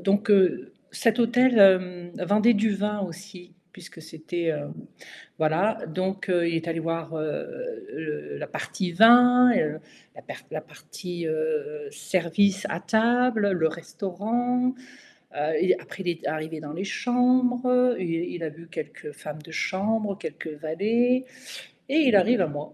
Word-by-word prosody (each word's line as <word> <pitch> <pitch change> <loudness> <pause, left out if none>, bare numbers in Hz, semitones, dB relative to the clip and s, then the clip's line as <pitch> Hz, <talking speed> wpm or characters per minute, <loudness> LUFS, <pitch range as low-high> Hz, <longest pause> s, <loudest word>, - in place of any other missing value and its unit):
donc 205 +1 +1
heu, 190 -3 +3 0.2
cet 230 0 +1
hôtel, 245 +1 +4
hem, 185 -3 +4 0.2
vendait 215 +3 +4
du 215 +1 +1
vin 210 +1 -2
aussi 185 0 -9 0.2
puisque 175 -2 -13
c'était 160 +1 -4
heu, 145 -1 -5 0.7
voilà, 175 +8 +1
donc 185 +4 -3
heu, 175 -1 +2
il 165 - -1
est 165 +1 -3
allé 165 0 -2
voir, 165 0 -4
heu, 475 - -5
le 150 - -6
la - - -5
partie 180 -3 -4
vin 245 +5 +7
et - - +2
heu, 155 0 -4 0.4
la - - -10
perte - - -10
la - - -4
partie, 175 -3 -8
heu, 450 - -3
service 195 - 0
à 165 - -3
table, 230 -1 +2
le 165 -3 +2
restaurant, 230 +9 -2 0.6
heu, - - -8 0.2
il, 185 - +4
après, 195 - -9
il 180 - -5
est 165 -1 -6
arrivé 155 +1 -4
dans 150 -1 -8
les 185 +4 -4
chambres, 245 +3 +1
heu, 250 -1 +3
il 180 -2 -2 0.2
il 175 - -6
a 160 - -3
vu 165 +2 -14
quelques 150 -3 -8
femmes 150 +1 -9
de 160 - -14
chambre, 205 +2 -1
quelques 160 -3 -7
valets 230 +11 +1 0.6
et 280 - 0
il 255 -9 +5
arrive 230 +5 +4
à 175 - +2
moi 145 0 -7
190 Hz, 160 wpm, -25 LUFS, 165-240 Hz, 0.7 s, vin